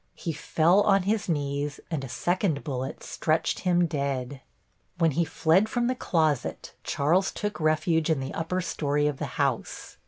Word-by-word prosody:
He 165 - -4
fell 165 +5 +3
on 195 -2 +3
his 205 0 0
knees 145 -1 -2
and 150 -5 -2
a 135 - -6
second 175 - 0
bullet 135 -3 -4
stretched 160 0 0
him 175 -1 +2
dead. 140 -4 -3 0.6
When 165 -2 +3
he 165 +5 +1
fled 165 +6 +2
from 240 +1 0
the 250 - +1
closet 155 - -1
Charles 175 +7 +1
took 210 -2 -4
refuge 155 +1 +1
in 160 -4 +2
the 135 +2 -5
upper 180 +3 -2
story 145 -4 0
of 150 -2 0
the - - -2
house. - - -2
160 Hz, 165 wpm, -27 LUFS, 145-180 Hz, 0.6 s, fell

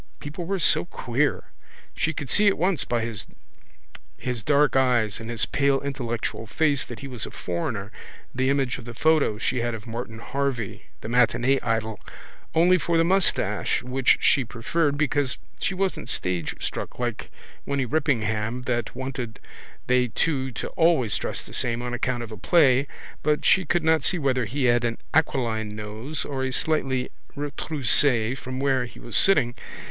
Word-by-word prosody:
People 155 +4 -6
were 195 +3 -1
so 175 - +2
queer. 135 -3 -1 0.5
She 160 - 0
could 145 -3 -5
see 210 +10 +4
at 200 - +4
once 180 -4 +1
by 120 -1 0
his 115 +2 -9
dark 145 +3 +3
eyes 120 -6 +2
and 115 0 -7
his 115 -1 +1
pale 140 -1 +2
intellectual 120 -5 -3
face 145 +5 +2
that - - -9
he 140 - -6
was 125 -5 -5
a - - -6
foreigner, 100 +4 -4 0.4
the 130 +1 +1
image 135 -3 0
of - - -11
the 120 -1 -8
photo 155 -5 +3
she 125 +2 -1
had 120 0 -1
of 110 - -9
Martin 115 -1 -6
Harvey, 130 -2 -3 0.2
the - - -6
matinee 125 +3 +3
idol, 110 -2 -1 0.6
only 180 +3 +5
for 170 +1 +1
the 165 - +5
moustache 190 +2 +1
which 125 +1 +3
she 135 - +4
preferred 140 +6 -1
because 145 -3 +1 0.2
she 190 - -1
wasn't 190 -9 -2
stagestruck 90 -7 -3
like 120 -3 -3 0.4
Winny 140 -2 0
Rippingham 115 -5 0
that 120 -2 -2
wanted 125 -3 -5 0.5
they 125 0 +3
two 135 +2 0
to - - -4
always 160 -10 +3
dress - - -3
the - - -13
same 120 0 -1
on 120 0 -3
account 120 0 -1
of 115 - -9
a 110 - -7
play 140 -5 +4 0.3
but 150 -1 +1
she 185 -2 +5
could 170 +2 +1
not 160 0 +3
see 180 - +2
whether 130 -5 +1
he 140 +5 -2
had 120 -1 +4
an 115 -1 -1 0.2
aquiline 115 -8 +1
nose 110 +8 -5
or 135 -2 -3
a 130 - -1
slightly 130 -3 0 0.2
retroussé 140 -4 +1
from 130 0 -6
where 135 -2 +2
he 120 - -13
was 120 - -5
sitting. 145 -11 +4
130 Hz, 170 wpm, -25 LUFS, 115-145 Hz, 0.6 s, only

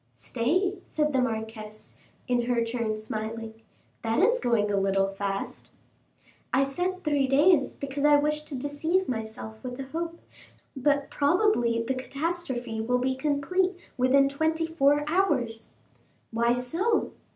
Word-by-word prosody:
"Stay," 360 - 0
said 300 -1 -1
the 260 - +3
marquise, 220 -2 -5 0.3
in 245 -2 +1
her 240 -2 +2
turn 230 -2 -2
smiling, 220 +1 -5 0.4
"that 225 0 0
is 465 +9 +4
going 220 -4 +1
a - - +1
little 195 0 +2
fast." 195 0 -4 0.8
"I 270 - +4
said 360 +7 -2
three 290 -3 +2
days, 290 +2 +4
because 280 0 -4
I 295 0 +6
wish 300 +1 +1
to 290 -3 -5
deceive 315 +7 0
myself 220 -1 -5
with 250 0 -6
a - - -2
hope; 335 +2 -4 0.6
but 285 +1 +1
probably 285 - +2
the 250 +3 -1
catastrophe 260 -4 -3
will 250 +3 +1
be 260 +1 0
complete 305 +7 0 0.2
within 260 +2 +4
twenty 315 +3 0
four 295 -2 +3
hours." 285 -11 0 0.6
"Why 235 +1 +2
so?" 340 - 0
270 Hz, 140 wpm, -27 LUFS, 230-310 Hz, 0.8 s, I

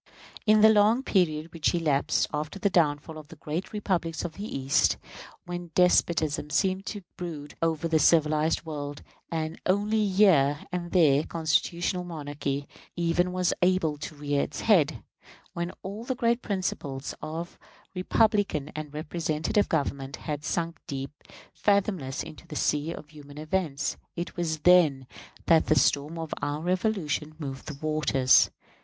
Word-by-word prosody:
In 215 0 +6
the 220 - +8
long 215 +5 +4
period 165 - 0
which 165 0 +1
elapsed 150 -5 +1
after 150 +5 -3
the 200 0 0
downfall 155 -1 +1
of 150 - -13
the - - -12
great 160 +5 -4
republics 175 -6 -2
of 165 - -5
the 200 +6 -6
East, 135 0 +2 0.5
when 175 -1 -6
despotism 160 -4 +2
seemed 190 +4 0
to 205 -3 -5
brood 155 -5 -6
over 165 0 0
the 160 -1 +2
civilized 155 0 +3
world, 145 -2 -6 0.3
and 160 -1 -3
only 210 +3 +2
here 160 -8 +4
and 175 -1 -4
there 150 -5 +4
constitutional 170 +3 0
monarchy 145 -4 -4 0.3
even 175 +1 +1
was 180 -1 +1
able 180 -4 +2
to 155 +1 -7
rear 145 -1 0
its - - -4
head 155 - +3 0.5
when 170 +1 -3
all 200 +4 -6
the 260 +2 -2
great 235 0 +1
principles 145 - -3
of 165 +3 -6 0.3
republican 195 -5 +1
and 150 -1 -7
representative 160 +5 -1
government 140 0 -1
had 150 -1 -5
sunk 165 0 -2
deep, 135 -1 -4 0.4
fathomless, 190 -9 0
into 165 +2 -12
the 155 - -8
sea 150 +2 0
of 150 -3 -9
human 145 -1 -13
events 155 -2 -2 0.2
it 170 0 -5
was 160 -3 -2
then 160 -7 +5 0.4
that 165 -1 +4
the 155 - +4
storm 145 +4 +2
of 160 -1 -4
our 145 +1 -2
Revolution 175 -4 -1
moved 135 -4 -7
the 150 - -6
waters. 140 -4 +4
160 Hz, 150 wpm, -27 LUFS, 150-180 Hz, 0.5 s, the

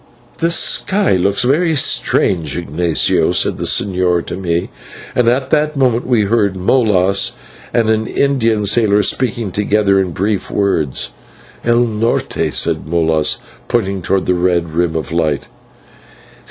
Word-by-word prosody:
"The 165 - +1
sky 195 +4 +2
looks 95 +2 +1
very 160 +6 +1
strange, 85 - +1
Ignatio," 85 0 +1
said - - 0
the - - -2
señor 90 -3 +1
to - - -5
me, 85 -2 -2 0.4
and 125 -2 +1
at 130 +2 -1
that 150 0 +1
moment 125 -3 +1
we 120 -4 +2
heard 100 -2 0
Molas 100 -2 +2 0.4
and 115 -2 +1
an 110 0 0
Indian 115 -7 0
sailor 105 -1 +2
speaking 120 -1 -1
together 100 0 +1
in 95 -1 -1
brief 100 +4 -2
words. 80 -11 -1 0.5
"/El 120 0 +2
Norte/,' 115 -1 -1
said - - -1
Moras, 80 -2 +1 0.3
pointing 100 -5 -1
towards 95 +2 -1
the 90 - +1
red 90 -1 0
rim 85 0 0
of 80 -4 -4
light. 80 -4 -1
100 Hz, 140 wpm, -15 LUFS, 90-120 Hz, 0.5 s, sky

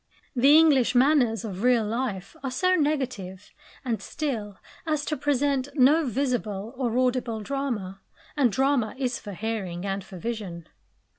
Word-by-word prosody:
The 275 +5 +6
English 285 -7 +4
manners 245 -5 +3
of 195 -3 -6
real 245 -2 +3
life 210 -4 -3
are 270 - -1
so 365 +9 +1
negative 255 - -2 0.3
and 230 -3 -1
still 220 -10 -4 0.3
as 305 -2 0
to 305 - -1
present 280 -2 0
no 295 +3 +4
visible 235 -4 -2
or 245 -2 -1
audible 250 -3 0
drama; 210 -7 -3 0.3
and 270 -6 +3
drama 265 -1 +1
is 255 -2 -2
for 205 -3 -8
hearing 195 -4 -4
and 195 0 -2
for 185 - -11
vision. 190 -5 -5
245 Hz, 145 wpm, -26 LUFS, 210-275 Hz, 0.3 s, The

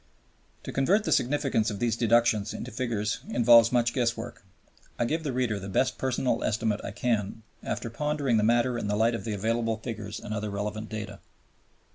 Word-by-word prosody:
To - - -6
convert 190 +11 +2
the - - -2
significance 130 -4 +1
of 105 - -4
these 115 +1 0
deductions 115 -3 +2
into - - -6
figures 115 -2 -2
involves 115 -1 +6
much 120 -1 +2
guesswork. 120 -3 -2 0.5
I 120 - +1
give 160 +7 -1
the 145 - -2
reader 120 -5 -1
the 100 0 -7
best 130 +7 0
personal 130 -1 0
estimate 110 -1 0
I - - -4
can 115 +1 0
form 105 +2 -8 0.2
after 115 - -4
pondering 145 -2 0
the 105 - +2
matter 120 +2 +2
in 105 - -3
the 105 - 0
light 115 +3 +2
of 115 - -4
the 110 - -2
available 115 +2 0
figures 110 -2 -6
and 105 - -6
other 105 0 -3
relevant 105 +2 -4
data. 105 -2 -6
115 Hz, 190 wpm, -27 LUFS, 105-120 Hz, 0.5 s, involves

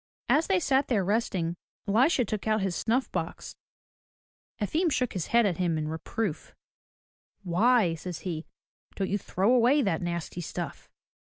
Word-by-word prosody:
As 315 - +3
they 385 -2 +3
sat 275 -3 +2
there 205 -7 +1
resting, 185 -5 0 0.3
Elisha 245 +5 +3
took 215 0 -4
out 215 -1 +2
his 190 -2 -1
snuff 240 +8 0
box. - - -4 1.0
Efim 315 - +1
shook 250 -3 0
his 180 -4 -3
head 235 -1 +4
at 180 -5 0
him 175 -3 +1
in 155 -1 -2
reproof. 160 +4 -4 0.9
"Why,'' 195 +1 +3
says 165 0 -6
he, 165 -3 -4 0.5
"don't 195 -1 -2
you 205 - +1
throw 195 +5 +1
away 255 +4 +4
that 165 -6 0
nasty 175 0 -3
stuff?" 170 -2 -6
200 Hz, 155 wpm, -28 LUFS, 175-245 Hz, 1.0 s, head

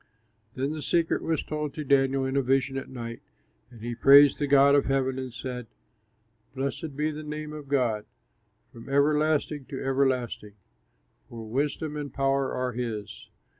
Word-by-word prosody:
Then 135 +2 -1
the 155 0 -5
secret 165 +2 +1
was 160 -2 -1
told 150 -2 -4
to 155 - -4
Daniel 135 -1 +2
in 130 +1 -2
a 140 - +3
vision 135 +1 +1
at 135 - -5
night, 115 -2 -7 0.5
and 120 -3 -15
he 120 +1 -4
praised 140 +4 +7
the 145 - 0
God 140 0 +6
of 145 - +4
heaven 130 -1 0
and 130 -1 -5
said: 125 -1 -6 0.9
"Blessed 140 +2 -4
be 155 +1 0
the 155 0 -7
name 150 0 -6
of 150 -2 -8
God 120 -7 0 0.7
From 115 +3 -11
everlasting 150 0 +1
to 135 - -6
everlasting! 130 -6 -1 0.8
For 115 -1 -8
wisdom 145 +5 -2
and 145 -1 -5
power 135 0 0
are 125 0 -2
his. 110 -4 -5
135 Hz, 165 wpm, -27 LUFS, 125-145 Hz, 0.9 s, praised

